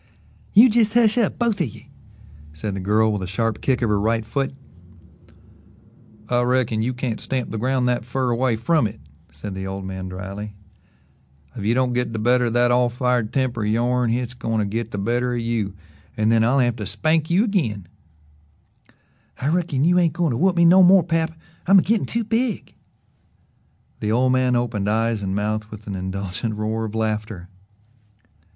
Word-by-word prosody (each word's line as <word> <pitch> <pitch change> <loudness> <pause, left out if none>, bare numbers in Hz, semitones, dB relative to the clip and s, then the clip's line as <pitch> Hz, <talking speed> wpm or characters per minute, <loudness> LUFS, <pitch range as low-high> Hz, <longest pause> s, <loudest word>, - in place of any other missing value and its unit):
"You 225 +5 +9
jes' 225 -1 +2
hush 225 -3 +4
up 220 - 0
both 230 -5 0
of 165 - +1
ye," 110 - -13 0.6
said 95 +7 -5
the - - -4
girl 105 +3 +2
with 105 - -3
a 95 - -4
sharp 110 +3 -2
kick 125 -2 0
of 115 - +1
her 105 -1 +2
right 110 +1 0
foot. 135 +4 -2 1.7
"I 120 +1 +1
reckon 120 -3 +1
you 120 +3 0
can't 125 -3 -3
stamp 130 -2 -3
the 110 - -4
ground 130 +1 0
that 125 -2 0
fer 125 +1 -2
away 120 0 +1
from 120 +3 +1
it," 100 - -11 0.3
said 80 +7 -8
the 95 0 -5
old 95 0 -5
man 95 -1 -6
dryly. 100 +3 -7 1.0
"If - - -6
you 115 +3 +2
don't 130 -1 +1
git 125 -1 -1
the - - -3
better 125 +3 +2
of 115 - -1
that 120 0 +3
all 125 0 +3
fired 125 -2 0
temper 130 -4 -1
o' - - -1
yourn 120 +3 +1
hit's 120 +1 -2
goin' 115 -2 -3
to 105 - +1
git 115 +3 -3
the 105 - -6
better 120 +5 -1
of - - -1
you, 115 -4 -2 0.4
an' 110 0 +2
then 115 -1 +3
I'll 125 +4 +2
have 120 -3 +1
to 105 - -5
spank 155 - 0
you 180 +5 +3
agin." 120 - -1 1.5
"I 135 - -1
reckon 160 -5 0
you 180 +3 +4
ain't 170 -4 +2
goin' 170 -3 0
to 115 - -1
whoop 185 +3 +2
me 170 -1 +4
no 180 +3 +7
more, 185 0 +6
pap. 165 -1 -1 0.3
I'm 195 +1 +7
a 185 - +5
gittin' 225 0 0
too 230 0 -1
big." 225 0 -2 1.3
The 105 - -2
old 125 +3 +2
man 130 -1 +2
opened 115 -4 -1
eyes 115 0 0
and 95 -1 -2
mouth 105 +1 -2
with 110 0 -11
an 100 - -5
indulgent 95 +3 -4
roar 110 +1 -2
of 110 0 -6
laughter. 105 -4 -3
120 Hz, 195 wpm, -22 LUFS, 105-135 Hz, 1.7 s, You